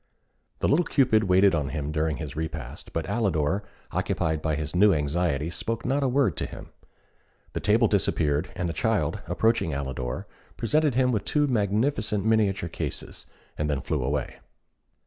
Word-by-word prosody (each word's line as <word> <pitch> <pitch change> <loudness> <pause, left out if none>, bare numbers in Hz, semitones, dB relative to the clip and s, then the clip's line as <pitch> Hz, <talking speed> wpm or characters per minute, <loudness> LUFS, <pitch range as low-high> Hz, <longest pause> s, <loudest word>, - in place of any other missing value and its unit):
The - - +2
little 160 +5 +4
Cupid 120 -8 +3
waited 95 +1 +5
on 75 -4 0
him 75 0 -3
during 75 -1 0
his 75 -3 -6
repast, 80 0 -6
but 80 -1 -2
Alidor, 100 -5 0 0.3
occupied 80 -1 -1
by 80 -1 0
his 75 +2 -4
new 100 +3 +6
anxiety, 75 0 0
spoke 115 +6 -3
not 135 +3 +1
a 135 - +2
word 125 - +2
to - - -1
him. - - -10 0.8
The - - -2
table 110 +3 +4
disappeared, 80 -6 +1
and 90 -2 -2
the 85 - -2
child, - - 0
approaching 90 -1 +1
Alidor, 65 -3 -4 0.3
presented 150 +3 +2
him 125 0 +3
with 110 -4 0
two 150 -1 +2
magnificent 105 -2 0
miniature 105 -5 +2
cases, - - -5 0.3
and 75 0 0
then 70 -2 0
flew 75 -3 -1
away. 65 0 -2
90 Hz, 165 wpm, -26 LUFS, 75-110 Hz, 0.8 s, new